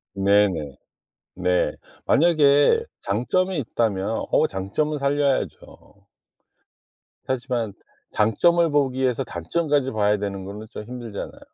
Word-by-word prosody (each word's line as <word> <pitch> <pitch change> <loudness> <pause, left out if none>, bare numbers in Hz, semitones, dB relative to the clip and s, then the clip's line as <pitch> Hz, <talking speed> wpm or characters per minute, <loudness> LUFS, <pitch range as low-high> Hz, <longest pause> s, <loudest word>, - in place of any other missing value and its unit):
네네. 95 -8 +2 0.6
네. 90 0 +1 0.3
만약에 155 - +4 0.2
장점이 175 - 0
있다면 110 -4 -1
어 - - +4
장점은 125 +11 -2
살려야죠. 140 -1 -2 1.2
하지만 125 -5 -2 0.4
장점을 165 +11 +3
보기 135 -3 +1
위해서 130 0 +1
단점까지 135 - -1
봐야 105 -1 +2
되는 100 -2 -4
거는 105 +3 -8
좀 105 - -8
힘들잖아요. 120 -3 -7
120 Hz, 245 characters per minute, -23 LUFS, 100-145 Hz, 1.2 s, 만약에